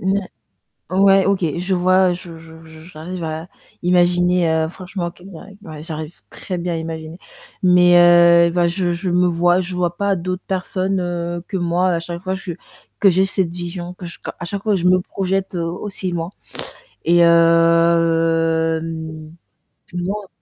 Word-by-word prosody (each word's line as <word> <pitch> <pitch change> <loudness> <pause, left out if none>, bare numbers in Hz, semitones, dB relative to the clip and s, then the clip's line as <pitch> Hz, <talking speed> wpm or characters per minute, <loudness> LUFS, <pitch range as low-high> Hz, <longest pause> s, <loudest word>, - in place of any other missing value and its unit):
Mouais. 195 +2 +1 0.7
Ouais, 195 +1 +4
OK, 195 -2 +1 0.2
je 180 +2 -1
vois, 185 +1 +3
je 175 -2 -8
je 160 0 -14
je 160 -1 -14
v - - -14
j'arrive 175 +1 -7
à 160 +2 -5 0.3
imaginer, 180 0 +2
heu, 160 0 +1
franchement 180 0 -6
qu'il 180 +2 -15
y 165 - -9
a - - -12 0.2
ouais, 155 -5 -9
j'arrive 155 0 -7
très 180 -2 -6
bien 175 0 -3
à - - -1
imaginer. 160 0 -6 0.4
Mais, 180 -1 +5
heu, 170 0 +6
bah, 175 0 +2
je 175 0 -1
je 170 +2 -3
me 180 +1 +2
vois 175 +1 +2
je 180 +1 -6
vois 175 -1 -1
pas 200 +1 +1
d'autres 185 +1 -4
personnes, 190 0 -2
heu, 175 -1 -3
que 195 - -3
moi 175 +1 +1
à 170 -2 0
chaque 170 +1 -7
fois 190 0 -2
je 190 -2 -6 0.5
que 200 - +6
j'ai 185 +2 +3
cette 190 -3 0
vision, 175 0 -6
que 180 - -11
je 170 - -8
ca - - -7
à 175 - -6
chaque 200 +3 -4
fois 210 -2 +1
je 175 - -3
me 185 0 +4
projette 195 +1 -3
aussi 180 +3 -4
loin. 170 0 -3 0.8
Et 175 +1 +4
hem 165 -1 +2 0.6
moi 195 +3 -3
175 Hz, 175 wpm, -19 LUFS, 165-185 Hz, 0.8 s, heu